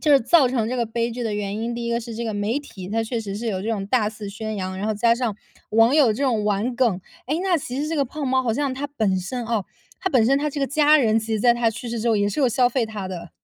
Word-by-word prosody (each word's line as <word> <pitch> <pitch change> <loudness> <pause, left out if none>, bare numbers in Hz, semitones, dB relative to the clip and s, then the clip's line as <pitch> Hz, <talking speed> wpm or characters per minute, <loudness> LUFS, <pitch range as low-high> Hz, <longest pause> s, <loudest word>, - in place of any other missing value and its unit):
就 300 -2 +4
是 275 - +6
造 280 +4 +5
成 235 -3 0
这 255 - -2
个 240 - +1
悲 230 +1 -1
剧 245 +1 -5
的 225 -2 -2
原 205 0 -3
因， 230 +2 -3
第 235 0 -4
一 235 - -1
个 235 - +1
是 230 -1 -7
这 230 - -4
个 220 -2 -3
媒 205 +6 0
体， 195 -10 -10
它 225 +1 0
确 230 +1 -3
实 200 -3 -5
是 230 +3 -5
有 195 -4 -2
这 220 - -4
种 200 -3 -2
大 215 0 +2
肆 210 -2 -8
宣 215 +2 -5
扬， 185 -1 -4
然 205 - -2
后 220 - +1
加 230 +2 +3
上 235 -4 -2 0.4
网 225 +4 +4
友 275 -8 +5
这 250 - -4
种 235 -6 +1
玩 210 +4 0
梗。 235 -8 +2 0.3
诶， 300 +5 0
那 370 -2 +2
其 265 -2 -4
实 300 - -2
这 325 - -2
个 280 - +2
胖 285 +3 -5
猫 260 0 +2
好 235 -3 0
像 280 +3 -1
他 280 +2 -3
本 220 -10 0
身 235 +7 -4
哦， 225 -4 -1 0.4
他 375 - -1
本 250 -8 +4
身 270 +3 +4
他 300 +1 -1
这 290 - -4
个 275 - +1
家 300 +2 +4
人， 225 -5 +3
其 225 0 -4
实 215 - 0
在 240 0 +5
他 235 -1 +1
去 235 +2 -7
世 235 0 -3
之 235 - -3
后 225 - +3
也 205 0 +2
是 205 - -4
有 265 - +4
消 245 +1 +3
费 245 -1 0
他 210 -4 -6
的。 170 -2 -7
230 Hz, 345 characters per minute, -23 LUFS, 215-260 Hz, 0.4 s, 是